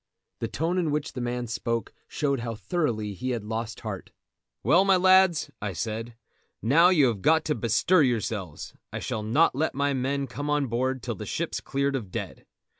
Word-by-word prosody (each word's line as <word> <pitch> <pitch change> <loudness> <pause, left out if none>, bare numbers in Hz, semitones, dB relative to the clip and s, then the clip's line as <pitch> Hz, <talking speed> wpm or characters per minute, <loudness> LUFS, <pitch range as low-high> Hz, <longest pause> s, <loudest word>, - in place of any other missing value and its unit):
The 115 - -2
tone 165 +10 -1
in 170 -3 0
which 150 0 -2
the 125 - -4
man 120 0 -2
spoke 115 0 -3
showed 140 -3 -1
how 115 -1 -4
thoroughly 110 - -1
he 125 +7 -4
had 120 -4 -2
lost 110 0 -4
heart. - - -6 0.5
"Well, 180 +3 +5
my 195 -1 +5
lads," 185 -2 +4
I 100 -2 -3
said, 115 +5 -4 0.4
"now 160 - +5
you 160 -7 +5
have 115 -6 0
got 160 +6 +3
to 150 - +1
bestir 115 - +3
yourselves. 110 - -2 0.2
I - - -4
shall 110 - -3
not 120 +10 +3
let 150 +3 -1
my 140 +1 +1
men 135 +2 -1
come 140 +4 -5
on 150 -1 +2
board 130 +1 -1
till 120 - -2
the 100 - -7
ship's - - -2
cleared 140 0 -1
of 110 -8 -4
dead. - - -6
130 Hz, 190 wpm, -27 LUFS, 115-150 Hz, 0.5 s, Well